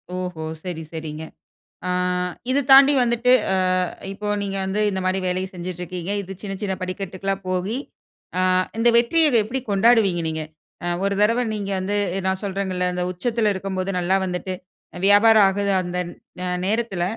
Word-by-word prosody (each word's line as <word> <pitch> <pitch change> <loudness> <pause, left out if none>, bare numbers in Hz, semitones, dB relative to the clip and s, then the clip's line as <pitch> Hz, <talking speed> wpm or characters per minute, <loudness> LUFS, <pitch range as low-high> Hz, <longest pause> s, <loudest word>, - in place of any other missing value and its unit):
ஓஹோ! 180 -3 -4 0.2
சரி 175 -3 -5
சரிங்க. 160 -1 -6 0.6
ஆங் 180 0 0 0.2
இத 265 +2 +3
தாண்டி 275 +1 +9
வந்துட்டு 240 +1 +2 0.2
அ - - +2 0.6
இப்போ 210 +1 -6 0.2
நீங்க 195 -1 -3
வந்து 195 +2 -1
இந்த 190 -2 -2
மாதிரி 185 +1 +1
வேலைய 185 +1 -1
செஞ்சிட்டு 180 0 -6
இருக்கிங்க, 180 +1 -5
இது 190 -1 -9
சின்ன 200 -2 -5
சின்ன 200 -2 -1
படிக்கட்டுகளா 190 +1 -3
போகி, 185 +5 -1 0.6
ஆ - - +3 0.4
இந்த 230 +1 +4
வெற்றிய 310 +7 +4 0.2
எப்படி 260 +4 -3
கொண்டாடுவீங்க 200 -4 +4
நீங்க? 160 0 -3 0.6
ஒரு 200 0 +1
தடவ 230 +4 +3
நீங்க 200 -1 -4
வந்து 200 +2 -1 0.3
நான் 190 0 0
சொல்றேங்கள்ள, 190 -2 -2
இந்த 180 0 -1
உச்சத்தில 220 +3 0
இருக்கும்போது 190 0 -3
நல்லா 180 +2 +1
வந்துட்டு 185 +1 -3 0.5
வியாபாரம் 205 +1 +6
ஆகுது, 200 +1 -1
அந்த 180 0 -4 0.7
நேரத்தில 215 -4 -1
190 Hz, 145 wpm, -22 LUFS, 180-210 Hz, 0.7 s, தாண்டி